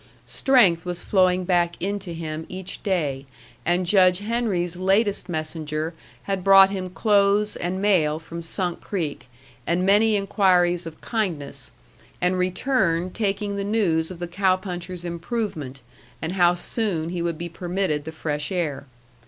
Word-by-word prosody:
Strength 205 -12 +3
was 180 -1 -4
flowing 185 -2 +3
back 175 -2 +1
into 195 -1 -3
him 160 -1 -5
each 185 0 -7
day, 145 -9 -1 0.4
and 175 +1 +2
Judge 185 -1 +5
Henry's 205 -5 -1
latest 195 +3 +1
messenger 155 0 -3 0.3
had 195 -2 -2
brought 195 0 +7
him 185 -2 -4
clothes 205 +1 +2
and 180 +2 -3
mail 175 -7 +2
from 165 +1 -8
Sunk 175 +1 -3
Creek 160 -10 -4 0.4
and 175 +2 +1
many 210 +3 +4
inquiries 180 -4 +2
of 160 - -10
kindness, 180 -11 -3 0.5
and 180 +1 +1
returned 180 -2 0
taking 200 -1 -1
the 200 - -2
news 190 -7 +1
of 185 - -8
the 175 +1 -4
cow 185 +2 +2
puncher's 180 -1 -6
improvement, 170 - -4 0.4
and 160 - -3
how 175 -2 +4
soon 175 -3 -1
he 175 0 -3
would 170 -1 -2
be 175 - -4
permitted 175 -3 -2
the 160 - -5
fresh 150 -1 -3
air. 150 -7 -2
180 Hz, 145 wpm, -24 LUFS, 165-195 Hz, 0.5 s, brought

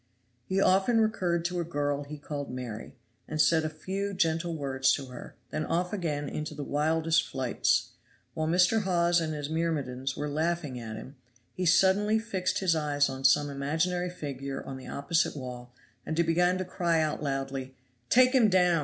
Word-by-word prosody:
He 190 - 0
often 195 +5 +4
recurred 180 -6 +1
to 180 0 -1
a - - 0
girl 145 -3 -2
he 150 +1 -8
called 145 -1 -5
Mary, 125 -4 -6 0.3
and 155 - -4
said 160 +1 +4
a 155 - -1
few 195 +6 -4
gentle 165 -1 0
words 135 -2 +1
to 140 - -2
her; 125 - -10 0.2
then 155 - -2
off 180 +4 -1
again 150 -7 -2
into 150 +1 -5
the 145 - -5
wildest 160 +3 +2
flights. 130 -2 +1 0.4
While 155 0 -2
Mr. 180 +6 +4
Hawes 175 -3 +2
and 155 -1 -2
his 145 -1 -4
myrmidons 145 -5 -2
were 150 - -2
laughing 155 -3 -1
at 110 -2 -6
him, 130 +5 -10 0.4
he 180 -1 -1
suddenly 195 +5 +4
fixed 195 -5 -1
his 180 -3 +3
eyes 145 -2 +1
on 135 0 -6
some 135 +2 +5
imaginary 160 +6 -1
figure 140 -5 -5
on 135 - -6
the 130 - -10
opposite 165 +4 0
wall 125 -2 -7 0.3
and 160 - -3
began 175 +2 +2
to 185 - -3
cry 170 -2 0
out 155 -1 -1
loudly, 135 -2 -3 0.3
"Take 255 +1 +5
him 240 -5 +5
down. 180 -3 +4
160 Hz, 180 wpm, -29 LUFS, 140-180 Hz, 0.4 s, some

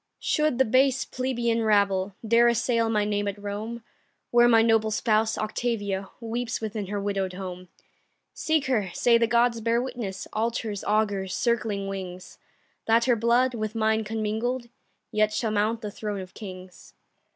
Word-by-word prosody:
Should 305 -4 +1
the 265 - +4
base 260 +3 +3
plebeian 240 -3 -1
rabble 200 -3 +2
Dare 235 +2 +5
assail 235 -1 +1
my 210 -2 +1
name 205 -1 -1
at 200 0 -3
Rome, 210 +3 -5 0.5
Where 240 0 +6
my 225 -2 +5
noble 225 -1 +3
spouse, 220 0 +1
Octavia, 205 -3 -2
Weeps 230 0 -3
within 215 -2 -4
her 205 +1 -3
widow'd 195 -2 -2
home, 185 -1 -7 0.7
Seek 315 -2 0
her; 220 -8 0
say 235 -1 +4
the 230 - +3
gods 235 0 +2
bear 230 +1 +2
witness 240 -7 -5
Altars, 220 -2 -2
augurs, 205 -3 0
circling 220 -4 0
wings 185 -2 -7 0.5
That 230 +1 +4
her 250 -2 +4
blood, 240 +3 +2
with 215 -1 -4
mine 220 0 +1
commingled, 225 +3 -2 0.4
Yet 215 0 +2
shall 220 0 -1
mount 215 +2 0
the 210 -2 -5
throne 205 -1 -4
of 185 0 -11
kings. 185 -3 -11
220 Hz, 155 wpm, -26 LUFS, 205-235 Hz, 0.7 s, Where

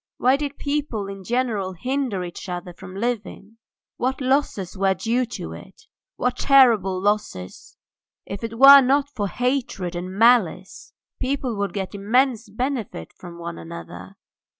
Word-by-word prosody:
Why 255 +2 +4
did 285 0 -4
people 285 -8 -2
in 195 -1 -8
general 225 -4 -1
hinder 250 0 -2
each 175 +2 -8
other 180 0 -5
from 185 +2 -11
living? 220 -1 -4 0.4
What 260 +2 -1
losses 260 -9 0
were 195 0 +2
due 235 +6 0
to 80 - -6
it! 85 +1 -13 0.3
what 250 0 -1
terrible 230 -9 +5
losses! 200 - -3 0.5
If 195 +3 -7
it 230 0 -5
were 275 +2 +10
not 275 +2 +2
for 210 -7 -2
hatred 240 -6 -2
and 180 +1 -5
malice 235 +5 +2 0.3
people 260 -2 -2
would 200 -3 -2
get 195 -1 -4
immense 230 +3 +1
benefit 230 - -4
from 175 -2 -10
one 170 - -7
another. 85 +2 -9
215 Hz, 145 wpm, -23 LUFS, 185-255 Hz, 0.5 s, were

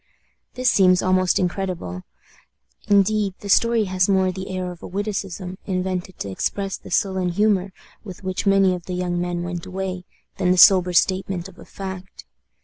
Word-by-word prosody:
This 255 -1 +2
seems 185 -2 +4
almost 185 0 +2
incredible. 180 - -3 0.9
Indeed, 205 -1 +2
the 200 - -7
story 230 +2 +4
has 185 -1 0
more 190 -1 +3
the 190 +1 -7
air 185 -1 -3
of 175 - -12
a - - -7
witticism, 195 -2 -4
invented 185 -1 -3
to 100 - -4
express 195 - -2
the - - -12
sullen 190 -2 0
humor 195 0 +1 0.3
with 195 -2 -10
which 185 +2 -3
many 195 -1 +4
of 180 -1 -7
the 180 - -3
young 175 -1 -1
men 175 -1 -2
went 175 -1 -5
away, 185 -1 -4 0.3
than 185 -2 +1
the 185 - +3
sober 180 -1 +7
statement 185 0 +1
of 190 -1 -16
a - - -12
fact. 190 -1 -8
185 Hz, 170 wpm, -22 LUFS, 180-195 Hz, 0.9 s, sober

